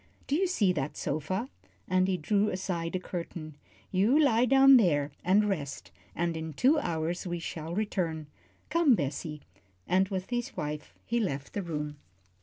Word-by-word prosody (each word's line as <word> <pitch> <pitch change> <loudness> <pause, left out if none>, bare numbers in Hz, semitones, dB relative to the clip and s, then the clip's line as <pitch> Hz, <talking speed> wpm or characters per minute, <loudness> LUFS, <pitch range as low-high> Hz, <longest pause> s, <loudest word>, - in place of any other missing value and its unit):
"Do 280 - 0
you 375 +4 +2
see 205 - +2
that 145 -3 -3
sofa?" 155 - -2 0.4
and 185 0 +2
he 190 -1 +1
drew 205 +5 +1
aside 180 -3 -3
a - - 0
curtain. 170 -4 -6 0.4
"You 210 +10 +4
lie 250 -5 +4
down 270 +1 +7
there 150 -9 +2
and 200 +4 +4
rest, 145 -9 -4 0.2
and 170 0 -1
in 160 -1 -5
two 275 - +4
hours 170 - -2
we 175 0 -2
shall 165 0 -5
return. 175 -7 -1 0.5
Come, 325 -6 +5
Bessie 150 -1 -4 0.2
" 95 -1 -38
and 190 +1 +2
with 190 +2 -4
his 240 +2 -3
wife 150 0 -5
he 235 +1 0
left 140 -10 -3
the 205 - -2
room. 150 -4 -4
180 Hz, 170 wpm, -29 LUFS, 155-215 Hz, 0.5 s, down